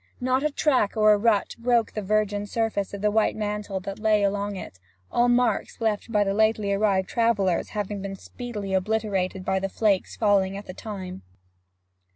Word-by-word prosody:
Not 255 +1 +1
a 300 - +1
track 260 -8 +1
or 215 -1 +6
rut 215 -2 +2
broke 235 -1 +2
the 215 - -4
virgin 205 0 0
surface 220 -3 -1
of 200 - -6
the 210 - +3
white 220 +1 +2
mantle 210 -2 -3
that 195 +2 -6
lay 215 -1 +3
along 200 0 -1
it, 95 - -9 0.3
all 240 0 +3
marks 245 0 +1
left 220 0 -1
by 210 -2 +3
the 195 -1 -1
lately 215 -1 +2
arrived 195 -2 +1
travellers 210 -7 +1
having 205 -1 -3
been 195 0 -5
speedily 210 -2 -6
obliterated 190 -2 -1
by 190 - +1
the 195 +1 -2
flakes 200 -2 0
falling 195 -3 +2
at 200 - -8
the 185 - -8
time. 190 -3 -7
205 Hz, 180 wpm, -25 LUFS, 195-220 Hz, 0.3 s, or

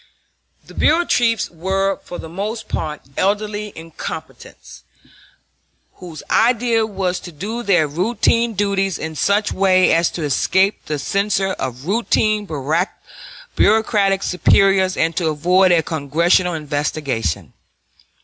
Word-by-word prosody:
The - - -14
bureau 335 +3 +2
chiefs 230 - +1
were 190 +3 -1
for 175 - -8
the - - -8
most 210 +6 -5
part 150 -1 -4
elderly 210 +1 -1
incompetents, 165 0 -9 1.2
whose 165 -4 -10
idea 230 -1 +2
was 190 -3 -2
to 175 - -10
do 205 +10 -5
their 180 -9 +2
routine 225 +7 0
duties 195 -2 0
in 160 0 -6
such 200 +8 +1
way 185 -1 +3
as 165 0 +3
to 165 - -4
escape 190 +7 +1
the 150 - -2
censure 195 +5 0
of 125 -3 -5
routine 215 0 +1 1.1
bureaucratic 205 -2 +2
superiors 190 +1 +3
and 165 0 0
to 170 - +1
avoid 180 +5 +3
a 170 -2 +3
Congressional 165 +4 +1
investigation. 145 - -3
190 Hz, 120 wpm, -19 LUFS, 165-210 Hz, 1.2 s, way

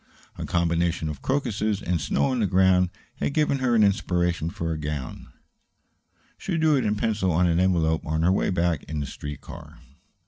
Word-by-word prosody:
A - - -6
combination 85 -1 0
of 75 -3 -6
crocuses 110 -6 -1
and 85 -5 -1
snow 65 - +1
on 130 - -1
the 105 - +2
ground 95 -1 +3 0.3
had 140 - -2
given 150 -3 +2
her 125 -2 +1
an 110 - +5
inspiration 90 -4 +1
for 85 -1 -4
a 80 - -2
gown. 75 -3 -5 1.1
She 180 -4 -2
drew 155 -2 +3
it 130 -4 0
in 105 0 +1
pencil 105 -4 0
on 85 +3 +2
an 85 0 +2
envelope 85 -4 +2
on 80 +1 -1
her 90 - +4
way 95 - +1
back 85 -4 0
in 75 0 -4
the 70 - -2
street 75 +2 -7
car. 80 -1 -11
90 Hz, 195 wpm, -25 LUFS, 80-105 Hz, 1.1 s, an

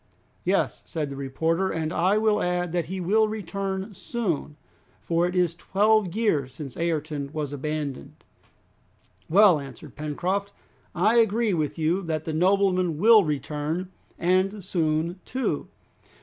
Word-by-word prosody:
"Yes," - - 0
said 150 -3 -4
the - - -5
reporter, 160 +7 0
"and 160 0 -2
I 185 +5 +2
will 215 -1 +2
add 180 -1 -1
that 175 -1 -1
he 190 +2 -4
will 215 +5 +3
return 195 -1 -4
soon, 180 - -3 0.5
for 170 +1 +1
it 180 - -4
is 175 -2 +2
twelve 200 +1 +2
years 145 - 0
since 135 -3 -8
Ayrton 155 -4 -2
was 150 -3 -3
abandoned." 145 -1 -5 1.1
"Well!" 185 -2 +6
answered 135 -4 -10
Pencroft, 180 +7 -2 0.4
"I 210 +7 +3
agree 225 -1 +3
with 155 -2 -1
you 165 +4 +1
that 160 -3 -3
the 160 - -3
nobleman 185 -1 +2
will 220 +4 +7
return, 150 +4 -3 0.3
and 185 +2 +1
soon 165 0 0
too. 260 0 -2
175 Hz, 135 wpm, -25 LUFS, 155-195 Hz, 1.1 s, will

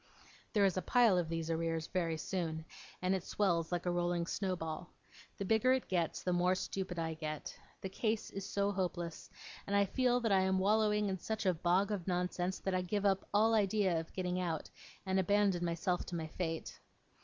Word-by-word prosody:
There 205 -3 +4
is 190 -2 +2
a - - +1
pile 235 +1 +4
of 165 -2 -2
these 165 0 -2
arrears 165 -1 -1
very 165 -3 -1
soon, 160 -2 -3 0.4
and 185 +1 +2
it 190 -2 -1
swells 170 -6 0
like 175 0 -1
a 175 - +1
rolling 175 -1 0
snowball. 175 -3 -3 0.5
The 200 - -3
bigger 220 +5 +4
it 260 - -1
gets, 170 -3 -1
the 180 - +1
more 180 +1 +3
stupid 185 -1 -4
I 165 -1 -1
get. 155 -1 -5 0.3
The 190 - -4
case 220 +2 -1
is 195 - -5
so 200 +1 0
hopeless, 175 -3 -3 0.4
and 200 - 0
I 200 0 +5
feel 245 +4 +2
that 225 -3 +1
I 195 - +5
am 190 0 +2
wallowing 210 +1 +3
in 190 -1 -2
such 220 +2 -3
a 185 - +4
bog 180 +5 +2
of 195 -4 -3
nonsense, 180 0 -1
that 190 - -1
I 185 - +2
give 200 +3 -1
up 195 -1 +1
all 220 +2 +4
idea 200 -4 +2
of 160 - -7
getting 180 -1 -1
out, 165 -3 -3 0.3
and 190 0 +1
abandon 195 -2 +2
myself 175 +1 -1
to 175 - -4
my 160 -1 -2
fate. 165 0 -4
185 Hz, 200 wpm, -34 LUFS, 170-200 Hz, 0.5 s, I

